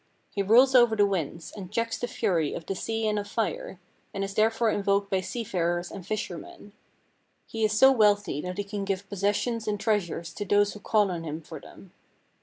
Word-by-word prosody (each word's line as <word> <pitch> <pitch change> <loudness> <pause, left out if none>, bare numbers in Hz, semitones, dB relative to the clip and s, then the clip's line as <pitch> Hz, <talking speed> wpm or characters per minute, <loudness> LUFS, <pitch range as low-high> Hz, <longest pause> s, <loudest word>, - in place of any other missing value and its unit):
He 200 - -1
rules 240 +7 +5
over 240 -3 +6
the 205 -1 +4
winds, 170 -4 -3
and 190 -3 -8
checks 230 +1 -1
the 245 - -2
fury 175 -11 0
of 165 - -7
the - - -2
sea 225 +3 -2
and 210 -1 +1
of 205 - -5
fire, 205 -3 -3 0.4
and 195 - -1
is 195 0 -4
therefore 225 +2 +2
invoked 200 0 0
by 190 -1 +2
sea 235 +5 -4
farers 175 -3 -1
and 195 - -8
fishermen. 205 0 -6 0.7
He 225 -1 -4
is 215 0 +2
so 265 +5 +7
wealthy 205 - +2
that 180 +2 -5
he 205 - -1
can 200 0 -5
give 195 0 -3
possessions 210 +3 -1
and 210 -1 -1
treasures 185 -7 -1
to 205 - -4
those 205 0 +2
who 210 - -10
call 205 -1 +2
on 170 -2 -4
him 155 0 -5
for 160 -1 -10
them. 185 +5 -15
205 Hz, 210 wpm, -27 LUFS, 185-220 Hz, 0.7 s, so